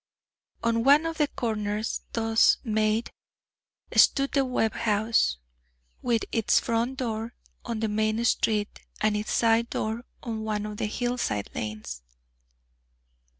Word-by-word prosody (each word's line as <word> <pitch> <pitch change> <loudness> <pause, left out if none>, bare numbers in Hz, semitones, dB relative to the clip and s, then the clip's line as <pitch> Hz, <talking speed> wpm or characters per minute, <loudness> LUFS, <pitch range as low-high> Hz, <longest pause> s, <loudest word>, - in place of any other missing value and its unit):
On 230 0 +1
one 285 +5 +6
of 330 0 -3
the 295 - +3
corners 215 -4 -2
thus 225 -1 +4
made, 220 -1 0 0.8
stood 275 -1 +5
the 275 - +2
Webb 250 -4 0
house, 215 - +1 0.6
with 230 -2 0
its 225 -3 +3
front 235 +3 -1
door 230 -2 -3 0.3
on 230 -2 -3
the 220 - +1
main 215 +2 0
street 215 -2 +1 0.2
and 215 0 +2
its 210 +1 -3
side 230 0 +3
door 220 +2 -3 0.2
on 225 -3 -4
one 210 -1 -2
of 210 -1 -6
the 210 - -1
hillside 240 - -2
lanes. 105 - -5
225 Hz, 130 wpm, -27 LUFS, 215-235 Hz, 0.8 s, one